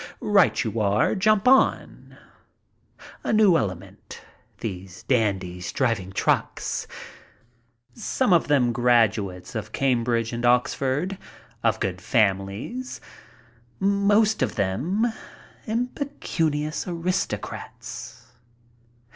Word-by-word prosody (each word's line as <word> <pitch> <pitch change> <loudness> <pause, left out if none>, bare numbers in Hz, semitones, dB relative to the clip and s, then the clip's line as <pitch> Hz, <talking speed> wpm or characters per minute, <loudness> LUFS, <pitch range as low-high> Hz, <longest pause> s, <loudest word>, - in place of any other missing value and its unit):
"Right 205 -3 +3
you 110 -1 -3
are. 105 0 +2
Jump 215 +2 +2
on." 265 +1 +2 1.1
A - - -1
new 215 -5 +5
element, 95 - -4 0.4
these 95 -3 -6
dandies 95 -7 -1
driving 115 -8 -1
trucks, 95 - -1 1.1
some 230 -1 0
of 170 - +3
them 135 -5 +3
graduates 110 -6 +1
of 110 -3 -5
Cambridge 120 -3 0
and 120 0 -4
Oxford, 135 +9 +1 0.4
of 110 -1 +1
good 95 -3 -3
families, 100 - -1 0.8
most 205 +2 +3
of - - 0
them, 145 - 0 0.6
impecunious 215 - -2
aristocrats. 170 -7 -4
125 Hz, 90 wpm, -24 LUFS, -, 1.1 s, new